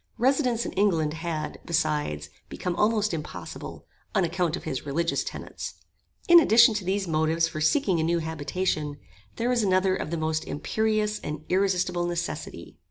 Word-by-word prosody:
Residence 250 -2 +2
in - - -3
England 165 -7 +1
had, 160 -2 -4
besides, 150 - -1 0.2
become 180 -1 -3
almost 210 -1 +2
impossible, 155 -2 -7 0.3
on 195 - +4
account 170 -1 0
of - - -8
his 135 -5 -3
religious 165 +4 0
tenets. - - -7 0.5
In 345 0 +10
addition 235 -6 +6
to 210 -2 -2
these 190 +1 -1
motives 160 +1 +2
for 155 - -5
seeking 185 - +2
a - - +1
new 170 +1 +2
habitation, 155 -1 -2 0.4
there 235 +2 -1
was 245 -2 +2
another 185 -1 +2
of - - -4
the 170 - -2
most 155 0 -1
imperious 215 +6 0
and 150 +1 -6
irresistable 180 -2 +1
necessity. 165 - -5
170 Hz, 160 wpm, -26 LUFS, 155-205 Hz, 0.5 s, In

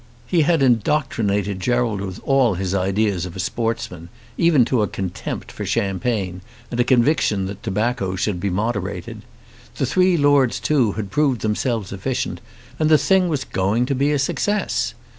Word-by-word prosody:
He 175 -3 +2
had 155 -1 +3
indoctrinated 110 -6 +1
Gerald 120 -1 0
with 95 -2 -5
all 135 -7 +3
his 95 +1 -2
ideas 95 -1 0
of 85 - -10
a - - -7
sportsman, 115 -5 -3 0.3
even 160 -8 +4
to 120 -1 +1
a 105 - +1
contempt 95 -2 -5
for - - -6
champagne 95 -2 -1 0.3
and 120 - -3
a - - +5
conviction 120 -5 +2
that 100 +1 -7
tobacco 105 -2 -1
should 95 0 -1
be 100 - -1
moderated. 100 0 -3 0.5
The - - 0
three 185 -1 +3
lords 145 -5 +3
too 115 -3 +2
had 105 -3 -5
proved 135 -3 +1
themselves 110 -1 -1
efficient, 120 +7 -3 0.4
and 155 -1 +2
the 155 - +7
thing 185 +2 +2
was 150 -4 -1
going 100 +6 0
to 140 - -1
be 140 +2 +1
a 145 - +2
success. 205 +9 -1
115 Hz, 165 wpm, -21 LUFS, 95-135 Hz, 0.5 s, the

